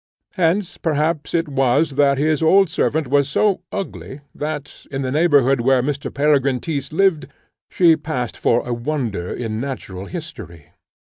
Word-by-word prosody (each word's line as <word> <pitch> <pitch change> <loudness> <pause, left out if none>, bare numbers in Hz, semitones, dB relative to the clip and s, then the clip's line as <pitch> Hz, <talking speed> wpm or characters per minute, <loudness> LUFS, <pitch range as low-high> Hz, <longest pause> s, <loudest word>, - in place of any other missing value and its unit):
Hence, 180 0 0
perhaps, 155 0 -1
it 165 -1 +1
was 140 +2 +1
that 140 0 +2
his 155 +1 +1
old 185 +2 +4
servant 160 -1 0
was 140 +1 +2
so 195 +4 +1
ugly, 180 -7 -6
that, 150 -1 -6
in 135 -1 -3
the 130 - -2
neighbourhood 140 -4 +3
where 130 0 +3
Mr. 140 0 -3
Peregrine 140 -3 +2
Tyss 140 -3 -4
lived, 175 -1 +2 0.4
she 170 -3 +4
passed 150 -6 -4
for 120 +1 +1
a 120 - -1
wonder 120 -8 -3
in 110 -2 -4
natural 100 -8 -6
history. 155 - -9
145 Hz, 150 wpm, -20 LUFS, 130-160 Hz, 0.4 s, old